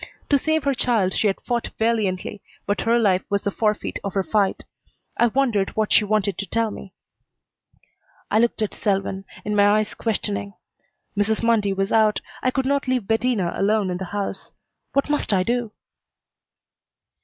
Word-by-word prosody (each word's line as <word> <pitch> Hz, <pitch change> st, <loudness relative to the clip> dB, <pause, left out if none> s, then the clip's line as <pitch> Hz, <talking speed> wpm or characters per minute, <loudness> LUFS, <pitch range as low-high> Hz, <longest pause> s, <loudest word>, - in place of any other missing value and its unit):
To 280 Hz, -, +5 dB
save 315 Hz, +1 st, +1 dB
her 280 Hz, 0 st, +2 dB
child 225 Hz, -7 st, +1 dB
she 215 Hz, -, +2 dB
had 195 Hz, -, 0 dB
fought 240 Hz, -2 st, -2 dB
valiantly, 210 Hz, -4 st, -1 dB, 0.2 s
but 205 Hz, -, 0 dB
her 230 Hz, +1 st, +3 dB
life 195 Hz, -5 st, +3 dB
was 200 Hz, 0 st, 0 dB
the 200 Hz, -, 0 dB
forfeit 210 Hz, 0 st, -1 dB
of 200 Hz, -, -4 dB
her 195 Hz, -, +2 dB
fight. 195 Hz, +3 st, 0 dB, 0.5 s
I 240 Hz, -, +4 dB
wondered 235 Hz, -5 st, +1 dB
what 215 Hz, -1 st, +1 dB
she -, -, +6 dB
wanted 205 Hz, -1 st, 0 dB
to 200 Hz, -, -3 dB
tell 230 Hz, -1 st, 0 dB
me. 195 Hz, -2 st, -10 dB, 1.4 s
I 215 Hz, -, +4 dB
looked 230 Hz, -1 st, +1 dB
at 210 Hz, -, -2 dB
Selwyn, 195 Hz, -1 st, -1 dB, 0.2 s
in 210 Hz, 0 st, -1 dB
my 205 Hz, +1 st, +5 dB
eyes 215 Hz, 0 st, -1 dB
questioning. 100 Hz, -, -3 dB, 0.6 s
Mrs. 210 Hz, +2 st, +1 dB
Mundy 225 Hz, -4 st, +3 dB
was 195 Hz, +1 st, -1 dB
out. 215 Hz, -1 st, +4 dB, 0.2 s
I 255 Hz, -, +2 dB
could 265 Hz, +1 st, -1 dB
not 280 Hz, 0 st, 0 dB
leave 255 Hz, -4 st, 0 dB
Bettina 225 Hz, -5 st, +1 dB
alone 205 Hz, -1 st, +1 dB
in 180 Hz, -, -2 dB
the 190 Hz, -, -5 dB
house. 200 Hz, +1 st, -4 dB, 0.4 s
What 275 Hz, -, +2 dB
must 295 Hz, -6 st, 0 dB
I 185 Hz, -1 st, +3 dB
do? 240 Hz, 0 st, -1 dB
210 Hz, 175 wpm, -23 LUFS, 195-235 Hz, 1.4 s, she